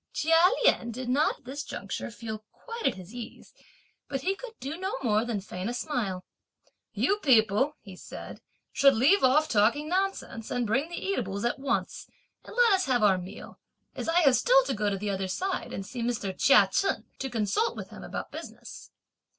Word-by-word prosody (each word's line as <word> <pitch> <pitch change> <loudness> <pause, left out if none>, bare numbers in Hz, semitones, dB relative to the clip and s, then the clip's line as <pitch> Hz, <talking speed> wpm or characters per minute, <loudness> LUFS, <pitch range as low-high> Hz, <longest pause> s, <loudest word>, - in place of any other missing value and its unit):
Chia 330 +3 +5 0.2
Lien 235 - +3
did 245 +2 -5
not 280 +5 +2
at - - -30
this 280 +4 -5
juncture - - -5
feel 220 -1 -6
quite 465 -1 -4
at - - 0
his 185 +3 -11
ease, 240 -2 -9 0.6
but 270 -2 -2
he 380 +7 +1
could 455 +2 -10
do 280 +4 -5
no 375 0 -3
more 215 -2 +2
than 235 -3 -2
feign 190 +1 -5
a 245 - -3
smile. 220 -9 -3 0.7
"You 400 - +1
people," 260 - +3
he 195 -3 -11
said, - - -9 0.3
"should 275 -1 +5
leave 275 - +4
off 295 +4 +4
talking 240 +7 +2
nonsense, 370 - -2
and 245 -1 -1
bring 265 +9 0
the 345 - -6
eatables 205 - -2
at 240 - -1
once 275 0 -2 0.4
and - - -11
let 480 -3 +5
us 380 -1 +2
have 245 -4 +1
our 195 -3 +4
meal, 185 +3 -10 0.3
as - - -4
I 345 +2 +4
have 275 -5 +5
still - - +5
to - - -2
go 210 -2 -1
on 200 -1 0
the 205 +1 -2
other 190 -1 -2
side 370 - -3
and 195 - -5
see 245 +3 -6
Mr. 225 -5 -2
Chia 205 -5 +6
Chen, 390 - 0
to 270 - -3
consult 235 - 0
with - - -8
him - - -10
about - - -6
business." - - -9
250 Hz, 200 wpm, -28 LUFS, 210-325 Hz, 0.7 s, Chia